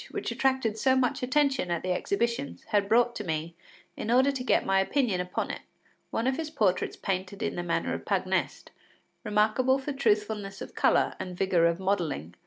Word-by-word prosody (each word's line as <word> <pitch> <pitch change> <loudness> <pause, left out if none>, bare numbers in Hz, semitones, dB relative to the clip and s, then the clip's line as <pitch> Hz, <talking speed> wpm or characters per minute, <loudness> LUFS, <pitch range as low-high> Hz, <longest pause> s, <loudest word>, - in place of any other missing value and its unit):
which - - -4
attracted 260 -5 0
so 260 +3 +3
much 260 +2 +1
attention 270 -5 +1
at 170 -1 -1
the 185 - -1
exhibitions, 235 +8 -1
had 200 -1 +1
brought 240 +1 +3
to 210 - -4
me, 160 -1 -3 0.4
in - - -5
order 260 +4 +4
to 265 -2 -4
get - - +2
my 195 0 +3
opinion 205 -2 +1
upon 180 +1 -3
it, - - -7 0.5
one 225 - -2
of 260 +1 +1
his 320 -1 -3
portraits 205 - 0
painted 190 +1 -3
in - - -2
the 175 - -2
manner 175 -1 -1
of - - -5
Pagnest, - - -1 0.5
remarkable 215 +5 +2
for 275 +2 -4
truthfulness 210 -5 0
of - - -8
colour - - +3
and 180 -1 -6
vigour 180 -3 +3
of 170 +1 -1
modelling. 170 - -1
210 Hz, 190 wpm, -28 LUFS, 185-260 Hz, 0.5 s, order